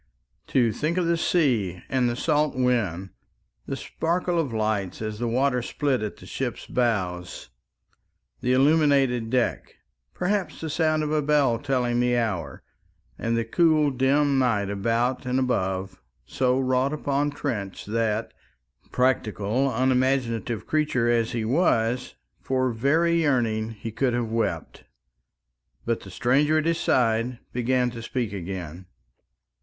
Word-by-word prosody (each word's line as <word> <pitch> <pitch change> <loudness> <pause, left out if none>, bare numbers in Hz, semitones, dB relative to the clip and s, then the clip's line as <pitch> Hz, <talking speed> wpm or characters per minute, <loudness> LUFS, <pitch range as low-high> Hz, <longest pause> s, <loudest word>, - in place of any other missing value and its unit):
To 120 -4 +2
think 155 - -2
of 180 - +1
the 170 0 +2
sea 120 - +1
and 130 -2 +1
the 120 - -2
salt 150 +2 +1
wind, 105 -8 0 0.6
the - - -2
sparkle 175 +1 -1
of 145 -6 -1
light 110 -4 -1
as 110 -1 -4
the 120 - -1
water 125 +2 +1
split 135 +1 -1
at 105 -1 -4
the - - -13
ship's - - -4
bows, 95 -8 -2 0.9
the 125 - 0
illuminated 135 -4 +3
deck, 125 0 -1 0.4
perhaps 195 0 -1
the 160 -1 -4
sound 155 0 +1
of 150 - -2
a 155 -1 +2
bell 140 -5 +2
telling 125 -3 0
the 125 0 +2
hour, 95 - -2 0.6
and 115 0 0
the 115 - 0
cool 155 +2 +3
dim 135 +2 +2
night 105 -6 +1
about 115 +6 0
and 125 +1 0
above, 95 -7 -2 0.2
so 130 0 +1
wrought 130 +2 +1
upon 145 -1 0
Trench 110 -10 -4
that, 110 0 -1 0.6
practical 125 0 +1
unimaginative 125 -2 0
creature 140 -6 +1
as 115 -1 +1
he 115 -2 -2
was, 125 -3 +1 0.2
for 130 -1 0
very 160 +8 +2
yearning 115 -7 +1
he 115 0 -7
could 120 +2 0
have 120 -2 -2
wept. 115 0 -2 1.0
But 115 -1 0
the 95 - -12
stranger 140 - +2
at 155 - 0
his 165 0 +1
side 120 0 +1 0.2
began 125 0 +1
to 115 -1 -8
speak 120 -2 -3
again. 90 -2 -6
125 Hz, 140 wpm, -25 LUFS, 115-140 Hz, 1.0 s, illuminated